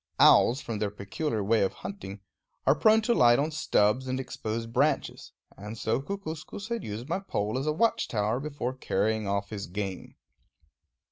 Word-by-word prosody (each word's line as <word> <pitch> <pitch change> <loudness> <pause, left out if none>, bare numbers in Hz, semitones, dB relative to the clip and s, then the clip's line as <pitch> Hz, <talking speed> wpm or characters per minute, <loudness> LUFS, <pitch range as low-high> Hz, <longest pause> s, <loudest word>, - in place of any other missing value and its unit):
Owls, 130 +4 +6
from 115 -3 -4
their 105 -1 0
peculiar 105 +4 -3
ways 110 0 +3
of - - -3
hunting, 100 - -8 0.4
are - - +6
prone 220 0 +4
to 235 - +2
light 120 - +6
on 150 +3 0
stubs 130 -4 +2
and 130 0 -1
exposed 115 -2 -4
branches; 145 +5 0 0.2
and 105 +3 -8
so 110 +4 0
Kookooskoos 195 +3 -6
had 235 -3 -2
used 110 +4 -6
my 170 +4 -1
pole 105 - -2
as 135 +3 -2
a - - +3
watch 225 +9 +1
tower 110 +2 0
before 140 -3 -3
carrying 110 -3 -1
off 100 +1 -2
his 100 -2 -5
game. 95 0 -5
120 Hz, 175 wpm, -28 LUFS, 105-150 Hz, 0.4 s, Owls